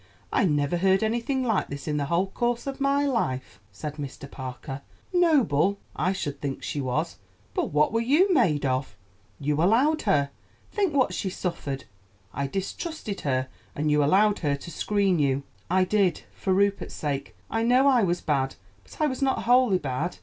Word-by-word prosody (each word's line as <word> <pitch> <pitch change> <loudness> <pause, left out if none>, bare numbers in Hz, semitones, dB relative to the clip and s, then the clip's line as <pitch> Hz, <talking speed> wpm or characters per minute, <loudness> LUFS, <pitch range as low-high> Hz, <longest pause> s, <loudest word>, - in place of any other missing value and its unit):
I - - +3
never 145 0 +1
heard 190 +3 +3
anything 240 +4 0
like 225 -6 +1
this 140 +2 -7
in 150 -1 0
the 145 - 0
whole 170 +6 +1
course 240 +4 -1
of 275 0 -5
my 280 +1 +2
life," 135 - -2
said 150 +9 -6
Mr. 140 -1 -6
Parker. 130 +1 -6 0.3
"Noble! 235 - +3 0.2
I 185 - +1
should 145 -7 -4
think 140 -2 -4
she 145 - -2
was; 135 - -2 0.3
but - - 0
what 150 +6 +3
were 230 - +2
you 315 +11 +4
made 165 - +3
of? 130 0 -1 0.4
You 150 +2 0
allowed 255 - +3
her! 140 -4 +2 0.4
Think 390 -8 0
what 260 -2 +3
she 195 - -2
suffered. 145 -7 -4 0.5
I 140 +1 -2
distrusted 200 - -4
her, 130 -2 0 0.3
and 150 +1 0
you 150 0 +4
allowed 200 +7 +4
her 145 -3 +1
to 140 +5 -9
screen 195 +1 +1
you." 140 -1 +1 0.3
"I 185 +1 +4
did, 185 -3 +1
for 190 - -2
Rupert's 200 +1 +1
sake. 145 -3 -3 0.2
I 225 - 0
know 250 +3 +4
I 255 -4 +5
was 180 -3 +1
bad, 135 -3 0 0.3
but - - -16
I - - +5
was 260 -3 -2
not 270 -1 +1
wholly 245 -4 +4
bad. 150 +3 -3
185 Hz, 180 wpm, -26 LUFS, 145-235 Hz, 0.5 s, I